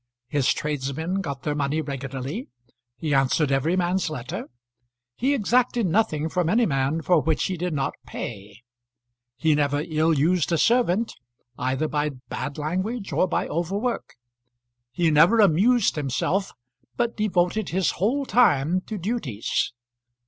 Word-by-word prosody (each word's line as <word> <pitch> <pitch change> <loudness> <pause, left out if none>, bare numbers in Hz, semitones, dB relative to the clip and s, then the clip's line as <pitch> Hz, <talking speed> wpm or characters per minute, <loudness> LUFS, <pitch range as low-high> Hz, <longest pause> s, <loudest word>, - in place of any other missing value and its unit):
His 145 -2 +2
tradesmen 150 +6 -2
got 140 -7 -5
their 150 - -1
money 145 +1 -1
regularly. 135 - -5 0.5
He 155 -3 -2
answered 135 +2 +2
every 135 +6 +2
man's 180 0 0
letter. 130 -5 -6 0.7
He 275 +3 +1
exacted 240 0 +2
nothing 160 -5 +1
from 175 0 0
any 230 +5 +3
man 140 +1 0
for 175 -4 +4
which 160 0 0
he 185 - -1
did 180 +1 -2
not 140 -3 -1
pay. 105 +1 -7 0.7
He 160 -1 +3
never 145 0 +1
ill 155 +1 +1
used 165 +3 +2
a 165 - +3
servant 230 +1 +2 0.4
either 130 +5 -1
by 150 0 0 0.2
bad 145 0 -4
language 185 +8 -3
or 185 - +2
by - - -1
over 175 +4 -2
work. 240 +3 -3 0.8
He 170 -3 +1
never 165 +10 +5
amused 205 +5 +4
himself, 150 +8 -1 0.5
but 240 -1 0
devoted 210 -1 0
his 185 0 +1
whole 250 +10 0
time 185 - +3
to 215 - -4
duties. 170 - -2
165 Hz, 140 wpm, -24 LUFS, 145-195 Hz, 0.8 s, never